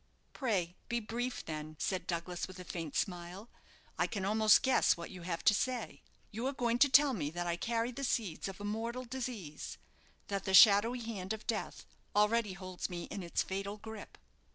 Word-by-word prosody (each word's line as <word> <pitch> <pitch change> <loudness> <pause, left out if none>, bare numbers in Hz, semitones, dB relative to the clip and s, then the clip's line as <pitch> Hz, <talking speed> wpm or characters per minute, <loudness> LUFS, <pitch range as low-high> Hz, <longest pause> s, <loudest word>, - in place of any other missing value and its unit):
"Pray 190 - -1
be 235 -1 +1
brief, 240 +3 -3
then," 155 -1 -5
said 185 -2 -1
Douglas 175 0 -3
with 185 - -11
a - - -6
faint 165 -4 -5
smile. 180 +4 -3 0.5
"I - - +3
can 200 -3 -3
almost 215 +1 +5
guess 260 - +4
what 170 - -7
you 180 - -9
have 170 -1 -3
to - - +6
say. 250 +2 -2 0.3
You 230 +5 -2
are 275 - -1
going 240 -2 0
to 285 - +6
tell 280 +1 +6
me 150 -10 -2
that 175 +2 -4
I 170 -1 0
carry 230 +6 -1
the 275 +3 -6
seeds 215 -11 -1
of 195 0 -7
a - - -7
mortal 230 +4 -3
disease; 235 - -5 0.5
that 200 -1 -3
the 190 -1 +3
shadowy 225 +4 +7
hand 215 -4 -4
of 220 - -8
death 220 -2 -3 0.3
already 210 0 +3
holds 185 -1 -5
me 175 -1 -5
in 200 - -4
its 170 -1 0
fatal 200 +2 -4
grip." 220 0 -9
205 Hz, 195 wpm, -33 LUFS, 180-235 Hz, 0.5 s, shadowy